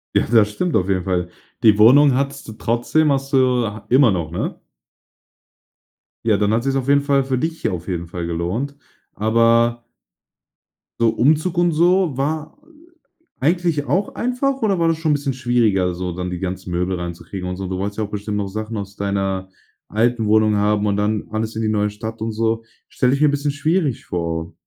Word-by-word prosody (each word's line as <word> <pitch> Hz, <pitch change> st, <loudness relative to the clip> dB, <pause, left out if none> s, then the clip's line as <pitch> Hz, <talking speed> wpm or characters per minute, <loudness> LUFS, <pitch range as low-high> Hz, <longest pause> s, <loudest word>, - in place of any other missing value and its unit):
Ja, -, -, +3 dB
das 110 Hz, -3 st, +4 dB
stimmt 170 Hz, +12 st, -2 dB
auf 95 Hz, -, +2 dB
jeden 95 Hz, -2 st, +1 dB
Fall. 90 Hz, -2 st, -1 dB, 0.3 s
Die 110 Hz, -2 st, +6 dB
Wohnung 135 Hz, +6 st, +7 dB
hattest 140 Hz, 0 st, -2 dB
du 110 Hz, -, -7 dB
trotzdem, 120 Hz, +8 st, +1 dB
hast 135 Hz, 0 st, -2 dB
du 125 Hz, -2 st, +3 dB
ha 105 Hz, 0 st, -8 dB
immer 130 Hz, -3 st, +5 dB
noch, 85 Hz, -4 st, -2 dB
ne? 85 Hz, -, -4 dB, 1.7 s
Ja, 110 Hz, -3 st, +3 dB
dann 105 Hz, +1 st, +1 dB
hat 115 Hz, +1 st, +1 dB
sich's 135 Hz, 0 st, 0 dB
auf 135 Hz, -1 st, -1 dB
jeden 140 Hz, 0 st, +4 dB
Fall 140 Hz, -1 st, +2 dB
für 130 Hz, -1 st, -1 dB
dich 160 Hz, +3 st, -3 dB
ja -, -, +1 dB
auf 90 Hz, 0 st, -6 dB
jeden 85 Hz, -2 st, -3 dB
Fall 85 Hz, -1 st, -5 dB
gelohnt, 90 Hz, +12 st, -3 dB, 0.4 s
aber 115 Hz, +2 st, +2 dB, 1.1 s
so 115 Hz, -1 st, +4 dB
Umzug 155 Hz, +9 st, +1 dB
und 175 Hz, -1 st, +3 dB
so 175 Hz, -2 st, +2 dB
war, 155 Hz, -, -3 dB, 0.6 s
äh, 330 Hz, -, -10 dB
eigentlich 170 Hz, -4 st, +1 dB
auch 195 Hz, +3 st, -1 dB
einfach, 255 Hz, +2 st, -1 dB
oder 200 Hz, -4 st, +1 dB
war 165 Hz, -, +2 dB
das 165 Hz, -, 0 dB
schon 160 Hz, -2 st, +1 dB
bisschen 140 Hz, -2 st, -1 dB
schwieriger, 115 Hz, -8 st, +1 dB
so, 90 Hz, 0 st, -4 dB
dann 90 Hz, +1 st, -4 dB
die 90 Hz, -1 st, -5 dB
ganzen 95 Hz, 0 st, -5 dB
Möbel 90 Hz, +1 st, -1 dB
reinzukriegen 90 Hz, +2 st, -6 dB
und 90 Hz, -, -3 dB
so? 95 Hz, 0 st, -4 dB
Du 95 Hz, 0 st, -3 dB
wolltest 100 Hz, +2 st, -4 dB
ja 110 Hz, -, -1 dB
auch 105 Hz, -, -12 dB
bestimmt 105 Hz, 0 st, -3 dB
noch 100 Hz, -1 st, -2 dB
Sachen 110 Hz, +3 st, -5 dB
aus 100 Hz, 0 st, -6 dB
deiner 95 Hz, -1 st, -2 dB, 0.4 s
alten 115 Hz, +1 st, +1 dB
Wohnung 110 Hz, 0 st, +3 dB
haben 105 Hz, 0 st, +1 dB
und 100 Hz, -1 st, 0 dB
dann 105 Hz, +1 st, -1 dB
alles 110 Hz, 0 st, -3 dB
in 110 Hz, -, -2 dB
die 110 Hz, -, 0 dB
neue 105 Hz, -1 st, +1 dB
Stadt 110 Hz, +1 st, -7 dB
und 115 Hz, -, -2 dB
so, 115 Hz, +1 st, 0 dB, 0.3 s
stelle 125 Hz, 0 st, +1 dB
ich 140 Hz, -, -1 dB
mir 150 Hz, -, +5 dB
bisschen 145 Hz, 0 st, -1 dB
schwierig 145 Hz, -2 st, -1 dB
vor. 85 Hz, -2 st, -3 dB
115 Hz, 200 wpm, -20 LUFS, 100-140 Hz, 1.7 s, Wohnung